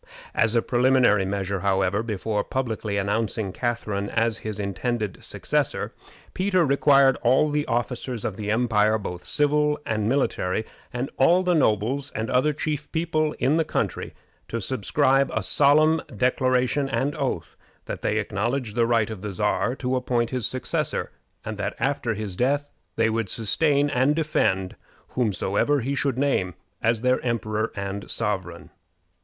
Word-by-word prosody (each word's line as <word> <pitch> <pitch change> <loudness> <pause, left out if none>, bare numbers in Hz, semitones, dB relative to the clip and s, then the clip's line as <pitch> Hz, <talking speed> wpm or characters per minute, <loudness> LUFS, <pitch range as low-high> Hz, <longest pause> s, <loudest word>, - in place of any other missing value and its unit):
As 115 +1 +2
a 115 - +3
preliminary 125 -5 +3
measure, 100 0 -2
however, 95 +1 +1
before 105 -1 -2
publicly 110 -5 -2
announcing 105 0 -1
Catharine 110 -5 -2
as 115 0 +1
his 110 -1 -5
intended 105 +1 -3
successor, - - -1 0.4
Peter 185 -2 +2
required 140 -1 +4
all 130 +5 +3
the 150 0 -1
officers 120 0 -2
of 105 - -2
the 105 0 -5
empire, 110 -1 +2
both 90 -4 -6
civil 150 0 +2
and 110 -1 -1
military, 110 -6 0 0.3
and 125 +2 -3
all 175 +7 +4
the 180 -1 +2
nobles 135 - +1
and 110 +1 -2
other 130 +4 +3
chief 150 0 -4
people 155 -2 0
of 145 +5 +2
the 165 - +3
country, - - -3 0.3
to 115 - -3
subscribe 135 +5 +2
a 110 - 0
solemn 155 +7 +4
declaration 130 +2 +1
and 140 +2 0
oath - - -3 0.3
that - - -5
they 105 - 0
acknowledged 110 +3 -2
the 115 -1 +2
right 115 -2 +2
of 105 -4 -7
the 105 0 -4
Czar 105 +6 0
to 130 -1 -2
appoint 125 -2 0
his 125 -4 -1
successor, 130 - -2 0.3
and 110 -1 -5
that 100 - -2
after 135 -5 -1
his 105 -3 -4
death 140 +7 0 0.2
they 115 0 +2
would 110 -3 -1
sustain 140 - +2
and 130 +4 +2
defend 95 - 0 0.3
whomsoever 120 +4 0
he 135 +4 -2
should 140 -2 -1
name 110 -11 0 0.3
as 115 0 +1
their 125 +1 +2
emperor 110 -2 -1
and 100 0 -5
sovereign. 95 -6 -2
120 Hz, 150 wpm, -24 LUFS, 105-140 Hz, 0.4 s, required